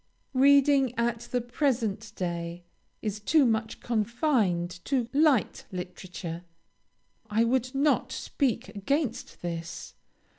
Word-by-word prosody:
Reading, 275 -1 +5
at 235 0 -1
the 245 - +1
present 230 -5 -1
day, 170 -1 -4 0.4
is 210 -1 -2
too 290 +7 +4
much 220 -1 0
confined 210 - 0
to 260 -4 +1
light 290 -5 +3
literature. 180 -2 -6 0.9
I 220 +2 +3
would 255 +2 0
not 270 -2 +2
speak 260 -2 -1
against 235 - -2
this. 165 -1 -5
230 Hz, 105 wpm, -28 LUFS, 190-265 Hz, 0.9 s, Reading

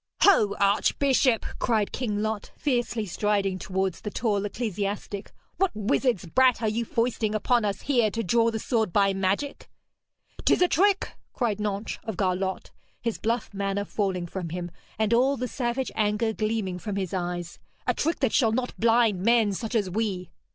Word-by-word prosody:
'Ho, 215 - +5
archbishop!' 235 +5 +3
cried 220 -4 +1
King 210 -5 -2
Lot, 215 -1 -3
fiercely 240 -5 0
striding 195 0 0
towards 190 -1 -2
the 210 - -4
tall 205 -2 0
ecclesiastic, 205 -2 -3 0.3
'what 385 0 +3
wizard's 215 -1 +1
brat 255 +7 +3
are 225 - 0
you 230 +2 -1
foisting 230 -2 0
upon 235 +2 +2
us 200 -2 -2
here 240 -6 +3
to 230 +2 -3
draw 230 +5 +3
the 225 - -2
sword 220 -3 0
by 195 +1 +3
magic?' 195 +9 -2 0.7
''Tis - - +4
a - - +5
trick!' 395 +2 +2 0.2
cried 220 -5 -1
Nentres 205 0 -3
of 220 -5 -5
Garlot, 190 0 -1 0.3
his 230 -2 -3
bluff 230 -1 -1
manner 200 0 -1
falling 190 -4 -1
from 175 0 -5
him, 175 +1 -5 0.3
and 220 +1 +1
all 265 +4 +3
the 250 +1 -2
savage 250 +1 -2
anger 215 +1 +1
gleaming 215 -4 -2
from 205 +1 -4
his 190 -2 -3
eyes. 175 -1 -3 0.3
'A - - +2
trick 325 +3 -1
that - - +2
shall 230 -5 +4
not 250 +1 -1
blind 225 -4 +3
men 225 -1 +3
such 225 +4 -4
as 210 -4 +2
we!' 185 -3 -2
215 Hz, 170 wpm, -26 LUFS, 195-235 Hz, 0.7 s, Ho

